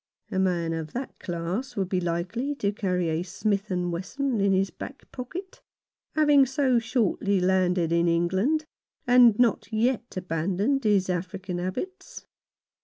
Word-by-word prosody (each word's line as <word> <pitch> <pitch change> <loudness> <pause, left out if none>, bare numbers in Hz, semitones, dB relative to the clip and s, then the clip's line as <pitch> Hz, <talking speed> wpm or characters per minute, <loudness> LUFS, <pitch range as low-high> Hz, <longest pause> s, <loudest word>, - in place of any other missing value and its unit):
A 190 - 0
man 175 -3 +1
of 160 -2 -5
that 255 +2 -6
class 175 +9 -4
would 195 -2 -1
be 185 -1 0
likely 180 +12 -2
to 200 -7 0
carry 180 -4 -1
a 160 +1 0
Smith 200 +3 -2
Wesson 185 +8 -1
in 200 0 +3
his 190 0 +2
back - - -9
pocket 345 +10 -7 0.3
— - - -50
having 295 -3 +6
so 260 -2 +2
shortly 220 -4 +1
landed 180 -2 +2
in 170 0 +3
England, 190 - +1 0.4
and 245 -3 +6
not 240 -4 +2
yet 235 0 0
abandoned 185 - 0
his 200 -3 +3
African 185 0 -3
habits. 185 - -5
195 Hz, 145 wpm, -26 LUFS, 180-245 Hz, 0.4 s, having